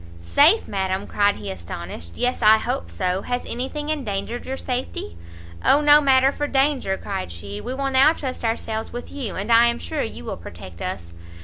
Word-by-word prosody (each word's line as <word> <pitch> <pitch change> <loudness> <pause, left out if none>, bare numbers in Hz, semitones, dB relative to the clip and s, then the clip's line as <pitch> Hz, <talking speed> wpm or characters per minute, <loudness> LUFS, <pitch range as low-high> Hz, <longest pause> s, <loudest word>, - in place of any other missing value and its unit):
"Safe, 305 - +4
Madam," 190 0 -2
cried 205 0 +2
he 100 -2 -6
astonished, 85 -1 -7
"yes 250 +1 0
I 215 +1 +7
hope 85 - -3
so! 180 - -1
has 245 +3 -3
any 250 +3 -2
thing 300 0 -5
endangered 240 -5 -3
your 265 +1 -3
safety?" 245 - -4 0.5
"O 285 - +5
no 295 0 +7
matter 270 -1 +4
for 290 +1 -3
danger," 270 -8 +1
cried 195 - -5
she, 100 +4 -7
"we 255 - -4
will 275 0 -1
now 270 +3 +6
trust 265 -7 -5
ourselves 225 -1 -2
with 245 0 -7
you, 255 -8 -4
and 205 +5 -3
I 230 +1 +7
am 235 0 +1
sure 305 +2 -4
you 80 - -5
will - - -4
protect 85 +1 -10
us." 85 -2 -5
230 Hz, 195 wpm, -23 LUFS, -, 0.5 s, I